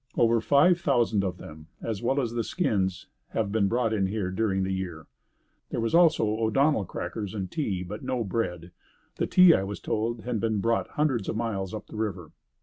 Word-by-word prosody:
Over 115 -1 +4
five 155 +8 +4
thousand 120 -9 +2
of 90 -2 -2
them, 80 -2 -11
as 110 -2 -4
well 135 +4 +1
as 120 -4 -1
the 120 -1 -1
skins 95 - -1 0.3
have 105 -3 0
been 105 -2 +2
brought 115 +1 0
in 100 -3 +1
here 95 -2 -2
during 95 -1 0
the 95 - -2
year." 90 -4 -5 0.6
There - - -3
was 115 0 -1
also 165 -8 +5
O'Donnell 110 +3 +1
crackers 105 +3 -5
and 95 -3 -4
tea, 100 - -2
but 105 +4 -7
no 125 -2 -1
bread. 90 -5 -3 0.5
The - - 0
tea, 180 -2 +7
I - - +2
was 100 +1 -5
told, 115 +1 -2
had 120 -1 -2
been 110 -1 0
brought 115 +3 +1
hundreds 135 -9 +1
of - - -2
miles 105 -5 -2
up 110 -1 -6
the - - -10
river. 95 -7 -3
110 Hz, 200 wpm, -27 LUFS, 95-120 Hz, 0.6 s, tea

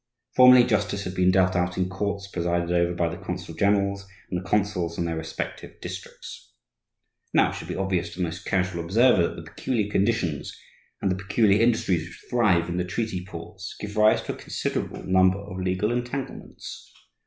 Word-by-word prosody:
Formerly, 125 -1 +9
justice 100 -3 0
had 90 - -5
been 90 0 +3
dealt 95 0 +3
out 90 0 0
in 90 -1 +1
courts 100 +1 -3
presided 85 -2 -1
over 85 0 +2
by 85 -1 +1
the 85 +3 -6
consul 90 -2 -5
generals 100 +2 +1 0.2
and 90 - 0
the 95 - -11
consuls 95 -5 0
in 85 - -1
their 85 -1 -2
respective 80 0 -6
districts. - - -9 0.8
Now - - +5
it - - -6
should - - -7
be - - -4
obvious 95 -1 -1
to - - -12
the 90 - 0
most 85 0 -4
casual 90 -2 -1
observer 100 0 +4
that - - -7
the - - -8
peculiar 110 -5 -1
conditions 95 -9 0 0.4
and 95 - +2
the 95 +2 -3
peculiar 100 +1 +3
industries 110 -7 +2
which 85 - -14
thrive 100 -9 +3
in 85 0 -3
the 90 - +1
treaty 95 0 -3
ports 95 +2 -8
give 105 0 -6
rise 105 0 +4
to - - -4
a - - -11
considerable - - -3
number 95 0 +4
of 100 -2 -7
legal 95 +4 0
entanglements. 125 +2 -5
95 Hz, 190 wpm, -25 LUFS, 90-105 Hz, 0.8 s, Formerly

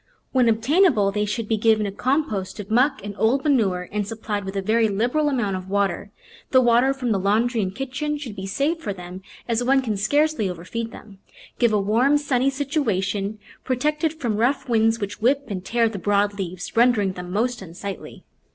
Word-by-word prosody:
When 250 -3 +3
obtainable 230 - +3
they 210 +1 0
should 210 +2 -3
be 220 - +1
given 220 0 +3
a 200 - -3
compost 250 -5 -1
of 205 0 -7
muck 255 -1 +2
and 205 - -5
old 260 +5 +2
manure 200 -11 +1
and 210 -1 -2
supplied 210 -2 -4
with 195 +1 -6
a 195 - 0
very 225 +2 +3
lib 220 +5 0
eral 305 -1 +2
amount 235 -8 -1
of 185 0 -9
water; 200 -1 0 0.4
the 260 - +5
water 245 +2 +4
from 260 -3 -2
the 200 - +1
laundry 220 +4 +1
and 190 -1 -3
kitchen 270 +4 -3
should 255 -8 -7
be 190 -1 -6
saved 295 - -1
for 205 - -3
them, 180 0 -9 0.3
as 235 0 0
one 270 +2 +4
can 220 -4 -1
scarcely 285 0 +1
overfeed 185 +7 -5
them. 200 -3 -13 0.4
Give 235 -2 +4
a 210 - +2
warm, 235 +9 +3
sunny 275 -2 +1
situa 275 - -1
tion, 200 +1 -3 0.3
protected 300 +5 0
from 240 -9 -2
rough 265 +4 +1
winds, 225 -1 +2
which 205 0 -5
whip 275 +5 +2
and 185 -3 -4
tear 230 +3 +1
the 215 -3 -5
broad 205 +1 +1
leaves, 185 -2 -6
rendering 225 -5 +3
them 180 -1 -8
most 240 +5 -1
unsightly. 190 +2 -8
225 Hz, 200 wpm, -23 LUFS, 200-260 Hz, 0.4 s, the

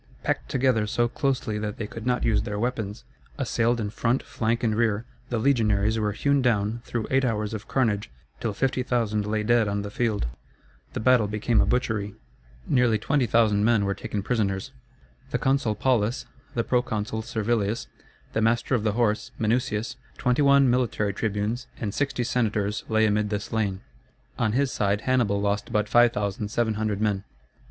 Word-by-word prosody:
Packed - - -1
together 125 -5 +2
so 120 +2 +1
closely 125 -5 -1
that 105 -1 -4
they 110 - -3
could 115 +2 -7
not 125 0 +1
use 110 - +3
their 105 0 -4
weapons, 110 -3 -3 0.3
assailed 120 +1 +1
in 105 -2 -2
front, 120 +4 0
flank, 115 +1 -1
and 110 -2 +2
rear, 110 -1 +1 0.2
the 120 - -1
legionaries 110 -4 +2
were 105 -1 0
hewn 140 +6 +1
down 115 -2 +1
through 115 -2 -3
eight 135 0 +3
hours 110 -3 -1
of 110 -1 -6
carnage, 110 - 0 0.3
till 115 - -1
50,000 120 -3 0
lay 105 0 0
dead 120 0 +3
on 100 0 -1
the 105 - -6
field. 110 - 0 0.7
The - - -3
battle 125 -2 +4
became 105 +2 +1
a - - +1
butchery. 110 -5 -1 0.5
Nearly 125 -3 +3
20,000 110 -4 +2
men 110 -2 +3
were 100 - 0
taken 100 0 -4
prisoners. 105 -1 -1 0.6
The - - 0
consul 135 -5 +1
Paulus, 120 0 +1 0.3
the 115 - +1
proconsul 110 -3 -1
Servilius, 110 -1 -1 0.5
the 110 - +1
master 115 +4 +1
of 120 - +2
the 105 -2 +1
horse 110 -2 +1
Minucius, 115 0 -1 0.2
21 140 +2 +4
military 120 -5 +1
tribunes, 110 +4 -2
and 105 -4 -3
60 140 -3 -1
senators 105 -4 0
lay 110 0 +3
amid 105 0 +1
the 105 -1 -1
slain. 100 -3 -2 0.6
On 110 -3 +1
his 135 +1 +1
side 100 0 0
Hannibal 120 -6 +1
lost 100 0 -1
but 105 0 +1
5,700 110 -1 +1
men. 105 -2 0
110 Hz, 160 wpm, -26 LUFS, 105-120 Hz, 0.7 s, battle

